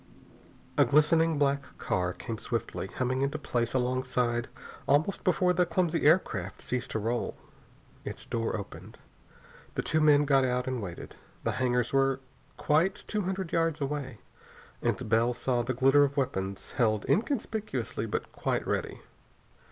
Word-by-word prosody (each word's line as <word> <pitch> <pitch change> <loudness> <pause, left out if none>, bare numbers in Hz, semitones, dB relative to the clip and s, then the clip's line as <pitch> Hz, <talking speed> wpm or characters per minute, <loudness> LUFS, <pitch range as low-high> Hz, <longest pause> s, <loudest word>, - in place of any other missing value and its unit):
A - - +9
glistening 160 +2 +4
black 140 -1 0
car 90 -1 -1
came 110 +4 -6
swiftly, 115 -5 -3
humming 125 +5 -1
into 140 +2 0
place 120 -4 -1
alongside 125 -1 0 0.4
almost 150 +7 +2
before 180 -1 +3
the 180 +1 +3
clumsy 170 -2 +1
aircraft 105 - +2
ceased 125 -1 -3
to - - -2
roll. 115 +3 -2 0.7
Its - - -7
door 115 -1 -1
opened. 100 - -9 0.9
Two 155 0 +1
men 145 -1 +5
got 135 -2 +4
out 125 0 0
and 130 -2 -2
waited. 90 -4 -8 0.3
The - - +1
hangars 125 -1 0
were 135 -1 +3 0.4
quite 165 +6 +2
two 210 0 -3
hundred 190 -2 -3
yards 165 -2 +1
away, 140 -3 -3 0.6
and - - -1
Bell 115 +3 +2
saw 125 -1 0
the 125 +1 -2
glitter 135 +3 +5
of 140 0 -1
weapons 95 -7 -2
held 110 -3 +1
inconspicuously 220 -2 -1
but - - -3
quite - - -1
ready. - - -2
135 Hz, 145 wpm, -29 LUFS, 120-155 Hz, 0.9 s, A